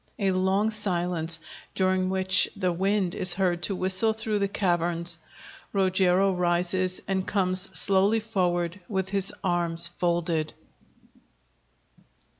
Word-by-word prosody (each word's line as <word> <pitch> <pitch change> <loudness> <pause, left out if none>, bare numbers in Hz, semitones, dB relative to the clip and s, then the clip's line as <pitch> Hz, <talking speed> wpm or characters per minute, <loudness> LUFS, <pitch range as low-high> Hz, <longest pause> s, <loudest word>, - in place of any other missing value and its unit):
A 195 -3 -1
long 190 +3 -1
silence, 175 -5 0 0.4
during 185 0 -1
which 190 0 +3
the 185 -3 -2
wind 190 0 -1
is 180 -1 +4
heard 180 -2 -2
to 195 +2 -2
whistle 190 +4 +4
through 220 -1 -3
the 200 - -1
caverns._ 175 -3 0 0.6
Rogero 190 0 +1
_rises, 180 +1 -1
and 190 -1 -3
comes 185 -1 0
slowly 200 +3 +3
forward, 180 -4 -3
with 190 -2 -3
his 195 -1 +2
arms 170 -2 +4
folded. 170 -2 -3
185 Hz, 115 wpm, -24 LUFS, 175-195 Hz, 0.6 s, is